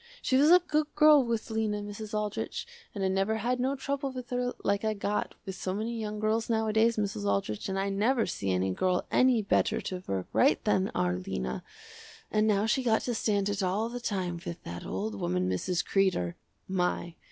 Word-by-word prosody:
She 260 - 0
was 285 +4 +5
a 355 - +9
good 305 -4 0
girl 300 -2 +7
was 230 -1 -2
Lena, 220 -1 0
Mrs. 205 +1 -7
Aldrich, 210 0 -3 0.3
and 200 - -2
I - - +3
never 195 +3 +1
had 245 +3 -1
no 265 +2 +1
trouble 275 0 -3
with 255 -1 -8
her 245 0 0
like 200 +1 +1
I 215 0 0
got 205 +1 -2
with 190 - -4
so 185 0 -3
many 225 +3 -2
young 210 -1 -4
girls 220 +2 0
nowadays, 220 0 +2
Mrs. 200 - -2
Aldrich, 100 - -1
and 190 - -2
I 195 +1 0
never 220 +5 +2
see 100 - -3
any 95 +1 +1
girl 180 - 0
any 250 -4 +4
better 200 - +2
to 185 -1 -5
work 95 -1 -2
right 275 - +4
than 195 -2 +2
our 90 0 +1
Lena, 65 -7 -4 0.7
and 215 0 +2
now 205 -1 +3
she 235 +4 +2
got 225 -3 +2
to 245 - -2
stand 205 -3 +1
it 200 0 -1
all 195 +5 0
the 245 +1 -5
time 185 -7 -2
with 175 -2 -7
that 85 0 -7
old 105 +4 -3
woman 90 +1 0
Mrs. 165 - -1
Kreder. 185 - +1 0.3
My! 180 -2 -1
210 Hz, 205 wpm, -29 LUFS, 180-230 Hz, 0.7 s, a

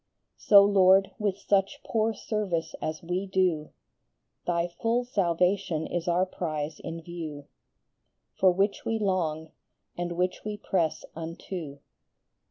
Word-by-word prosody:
35 - - -29
So, 200 -1 +10
Lord, 195 -1 +5
with 205 -3 0
such 195 -1 0
poor 225 0 +1
service 210 -7 -2
as 155 +1 -3
we 180 +3 -2
do, 180 -5 +1 0.8
Thy 170 -1 +1
full 230 +8 0
salvation 180 -6 +1
is 175 -1 -3
our 175 +2 +3
prize 155 -4 -4
in 165 0 -6
view, 160 -4 -7 0.9
For 190 - +4
which 195 +3 0
we 225 - 0
long, 165 -6 -1 0.4
and 175 0 -3
which 180 +1 0
we 210 -1 -4
press 170 -6 -1
unto. 165 -2 -6
180 Hz, 130 wpm, -28 LUFS, 165-200 Hz, 0.9 s, So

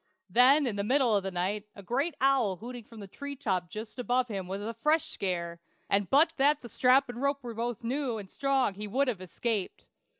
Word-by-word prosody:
Then 270 +5 +6
in 220 -5 -2
the 200 - -1
middle 250 0 +3
of 200 - +2
the 195 - -3
night, 195 +4 -2
a 200 - -11
great 275 - -1
owl 260 -7 +3
hooting 240 +4 -9
from 225 -2 -12
the 200 - -8
tree 280 +8 -7
top 185 -9 -2
just 215 +6 -7
above 250 0 +1
him 195 -4 -4
was 195 +2 -4
a 220 +3 -4
fresh 305 +5 +1
scare, 170 -3 -3 0.3
and 200 -1 +2
but 315 +4 +5
that 285 +1 +3
the 240 - -8
strap 260 +4 +4
and 245 0 -7
rope 280 0 0
both 235 -1 -4
were - - -4
new 260 -2 -1
and 200 -2 -7
strong 270 0 0
he 210 +2 -6
would 265 +7 +1
have 220 -7 -2
escaped. 200 +2 -3
235 Hz, 225 wpm, -29 LUFS, 200-270 Hz, 0.3 s, Then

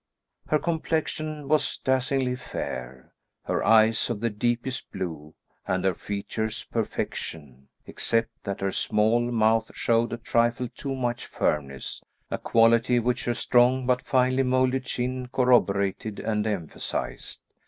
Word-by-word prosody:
Her 155 - +3
complexion 155 -2 -2
was 155 0 +2
dazzlingly 130 -1 +1
fair, 65 - -6 0.3
her - - -1
eyes 110 +1 +4
of 115 -3 -2
the 115 +1 0
deepest 120 +4 -2
blue, 80 -4 -6 0.3
and 95 0 0
her 95 - +3
features 105 +4 -4
perfection, 70 -4 -4 0.2
except 115 0 0
that 100 -1 -4
her 95 0 0
small 110 +4 +2
mouth 115 -1 +2
showed 115 0 +1
a 120 - -3
trifle 120 +1 +1
too 135 +2 -5
much 120 -2 -2
firmness, 70 -3 -2 0.3
a - - -2
quality 115 +1 +4
which 120 +1 0
her 120 - 0
strong 125 +2 +3
but 125 0 +2
finely 130 0 +2
moulded 130 0 +1
chin 125 0 -2
corroborated 105 -5 +2
and 105 -1 -1
emphasised. 95 -7 -4
115 Hz, 130 wpm, -26 LUFS, 105-125 Hz, 0.3 s, eyes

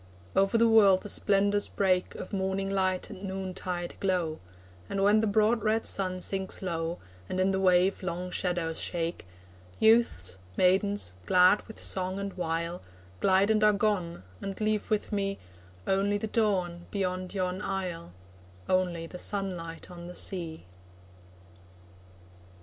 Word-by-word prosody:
Over 195 +4 +3
the 230 0 +5
world 205 -4 +6
the 205 - -6
splendours 205 0 +2
break 185 -2 0
Of 185 - -8
morning 195 0 -1
light 185 -1 0
and 195 -1 -10
noontide 185 -2 -4
glow, 180 -5 0 0.5
And 195 0 -1
when 205 +2 +5
the 220 - +1
broad 215 +2 +3
red 220 +1 +1
sun 185 -2 0
sinks 190 0 -1
low, 165 -1 -2 0.3
And 185 - -2
in 190 +1 +3
the 190 - 0
wave 185 0 +3
long 180 0 -4
shadows 175 -3 -1
shake, 170 - -3 0.5
Youths, 220 - +3 0.2
maidens, 190 - +2
glad 185 +3 +6
with 220 - -11
song 185 0 -2
and 200 0 -4
wile, 170 0 -2 0.4
Glide 195 +2 +4
and 215 -1 +2
are 210 0 +6
gone, 200 - -1 0.2
and 195 -1 -5
leave 215 -1 0
with 215 +1 -1
me 195 -1 -1 0.5
Only 200 +1 +1
the 205 - -3
dawn 185 -6 0
beyond 185 -1 -3
yon 185 0 -1
isle, 185 - -4 0.6
Only 180 -3 0
the 180 +2 -9
sunlight 180 -5 -3
on 175 -1 -9
the 180 - -9
sea. 165 - -4
190 Hz, 145 wpm, -29 LUFS, 180-200 Hz, 0.6 s, world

